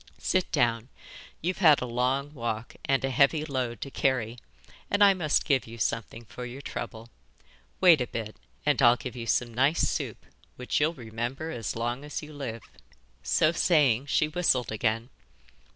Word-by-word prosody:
'Sit 185 -1 0
down, 115 0 +1 0.5
you've 180 +3 -1
had 155 -6 +6
a - - -3
long 130 +4 -1
walk 115 -3 -4
and 135 -1 +1
a 135 - -2
heavy 145 +4 +3
load 130 -5 -3
to 140 - -6
carry, 125 -4 0 0.5
and 205 0 +3
I 200 -1 +7
must 160 -6 +1
give 135 -5 +1
you 115 +1 -9
something 115 +1 -3
for 105 +5 -9
your 125 +2 -7
trouble. 115 -1 -6 0.7
Wait 170 -7 +6
a 125 - -1
bit, 110 -2 -5 0.3
and 145 -3 +2
I'll 120 0 +7
give 125 +1 -7
you 115 -2 -6
some 120 +1 0
nice 135 +7 +2
soup, - - -4 0.3
which 125 - -1
you'll 155 +3 +1
remember 120 +5 -5
as 115 -8 -4
long 120 +4 -2
as 150 +1 -5
you 150 0 -10
live.' 125 -6 -6 0.6
So 70 - +2
saying, 145 -7 +3
she 150 - +2
whistled 155 -8 +1
again. 115 +2 -1
125 Hz, 170 wpm, -27 LUFS, 115-150 Hz, 0.7 s, I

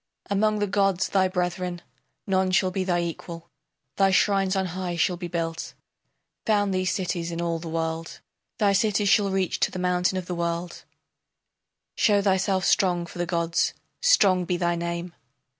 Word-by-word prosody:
Among 215 +2 +2
the 205 - +1
gods 195 -2 +1
thy 190 -1 +3
brethren, 180 -1 -3 0.4
none 190 -1 +1
shall 185 0 +2
be 190 +1 -1
thy 175 -2 +1
equal, 170 0 -6 0.5
Thy 195 -1 +4
shrines 195 0 +2
on 190 0 +1
high 180 -1 -3
shall 170 +2 +1
be 175 0 -6
built; 165 -1 -4 0.7
Found 205 -2 +2
thee 185 0 0
cities 180 -3 -2
in 170 - -4
all 170 -1 -1
the 165 0 -7
world; 165 0 -3 0.4
Thy 205 -3 +3
cities 205 0 +2
shall 200 0 +4
reach 190 -2 -1
to - - +2
the - - -7
mountain 180 +1 +1
of 185 - -4
the 180 - -4
world; 170 0 -3 1.1
Show 205 -2 +3
thyself 190 -1 +1
strong 180 -4 +2
for 175 - -11
the 175 - -1
gods, 170 -1 0 0.3
strong 200 - +4
be 175 0 -1
thy 175 -1 0
name! 170 +1 -4
180 Hz, 170 wpm, -25 LUFS, 170-195 Hz, 1.1 s, Thy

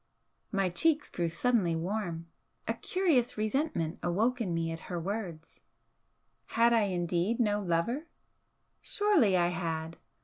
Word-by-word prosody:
My 195 -2 +1
cheeks 300 - +1
grew 170 -1 -1
suddenly 185 -2 +1
warm. 170 -1 -3 0.4
A - - +1
curious 325 - +1
resentment 215 - -1
awoke 225 +8 +1
in 195 -6 -1
me 165 -1 -1
at 165 - -5
her 175 -2 -2
words 175 -3 -5 0.9
had 235 +1 +3
I 225 -3 +4
indeed 180 +4 0
no 210 -3 +2
lover? 200 - -1 0.7
Surely 345 - +3
I 175 0 +3
had! 165 -2 -3
195 Hz, 130 wpm, -30 LUFS, 170-235 Hz, 0.9 s, I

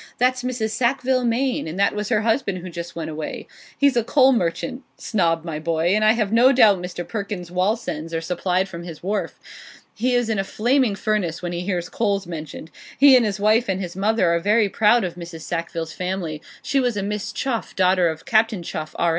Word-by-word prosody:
That's 255 +1 +2
Mrs. 245 -3 -2
Sackville 255 +1 +1
Maine, 245 -2 0
and 160 +3 -6
that 200 - +3
was 210 0 -3
her 220 -3 +2
husband 225 -3 0
who 180 0 -8
just 170 0 -7
went 160 -2 -4
away. 155 0 -6 0.3
He's 280 -2 +3
a 235 - +2
coal 265 +2 +4
merchant, 235 +6 -2 0.2
Snob 170 -6 0
my 160 -3 -4
boy, 165 +1 0
and 215 +1 +2
I 215 +1 +6
have 215 -3 -1
no 245 +3 +6
doubt 215 -7 +5
Mr. 175 -1 -6
Perkins's 200 -5 -5
Wallsends 180 -4 -1
are 165 - -1
supplied 180 +2 -1
from 170 -3 -8
his 170 -2 -9
wharf. 205 +3 -3 0.5
He 245 +3 0
is 245 -2 +1
in 220 -3 0
a - - +1
flaming 240 +2 +1
furnace 195 -5 -1
when 175 - -3
he 175 0 -3
hears 180 -2 -2
coals 200 -3 -1
mentioned. 160 -2 -8 0.3
He 275 -1 +8
and 250 - +5
his 210 -2 -2
wife 215 +3 +3
and 190 0 0
his 175 -3 -5
mother 195 -3 +2
are 170 - +2
very 210 +3 +2
proud 220 +4 +3
of 180 -2 -3
Mrs. 170 -2 -9
Sackville's 165 -1 -4
family; 180 -4 -4 0.2
she 275 - +1
was 245 -4 0
a 200 - -1
Miss 205 0 -3
Chuff, 245 -4 -3
daughter 185 -2 +3
of 160 0 -7
Captain 220 -4 +2
Chuff, 155 -1 -6
R. 170 - +2
200 Hz, 215 wpm, -22 LUFS, 170-230 Hz, 0.5 s, He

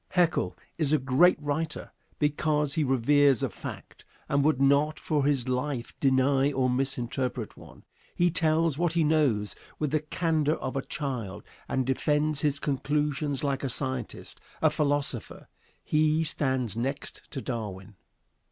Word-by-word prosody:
Haeckel 175 -2 +1 0.2
is 150 -3 +2
a 155 - +5
great 135 +7 +4
writer 150 +2 -3 0.3
because 150 -1 +1
he 155 - +1
reveres 135 0 +3
a - - -1
fact, - - -9 0.2
and 140 0 +2
would 150 -3 +2
not 140 +3 +3
for 150 -6 0
his 135 -4 +1
life 130 -1 -2
deny 135 +1 +3
or 130 -2 +1
misinterpret 125 -2 -2
one. - - -15 0.3
He 175 0 +3
tells 160 -2 +2
what 175 -1 +1
he 170 -1 +2
knows 145 -10 +2 0.2
with 150 -3 -1
the 155 - +2
candor 155 0 0
of 130 - -5
a 135 - 0
child 130 -10 -4 0.2
and 130 -1 0
defends 150 +3 +1
his 145 -2 +1
conclusions 145 0 -1
like 140 -1 -1
a 135 - -1
scientist, 130 -2 -3 0.2
a - - +3
philosopher. 145 -5 -1 0.4
He 155 +1 +2
stands 130 -8 0
next 135 +5 -3
to 135 - -5
Darwin. 105 -6 -5
140 Hz, 145 wpm, -28 LUFS, 130-150 Hz, 0.4 s, a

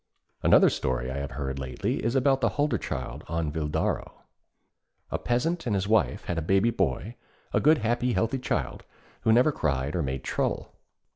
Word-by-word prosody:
_' - - -56 0.4
Another - - +6
story 65 -1 -2
I 65 - -4
have 70 0 -3
heard 65 0 -4
lately 65 -2 -2
is 115 +4 0
about 135 0 +3
a - - +4
Hulderchild 145 - -2
on 80 -2 -1
Videró. 75 -1 -1 1.0
A - - -1
peasant 165 +7 -1
and 105 - +1
his 95 0 -1
wife 110 -1 +2
had 85 -2 -1
a - - -3
baby 95 +8 +3
boy, 115 0 -1 0.4
a - - +4
good 155 +2 +5
happy 120 +1 0
healthy 115 +4 0
child, 65 - -2 0.4
who 110 - +3
never 125 +7 +5
cried 70 - -1
or 85 - +1
made 65 -2 -3
trouble. - - -2
95 Hz, 180 wpm, -27 LUFS, -, 1.0 s, Another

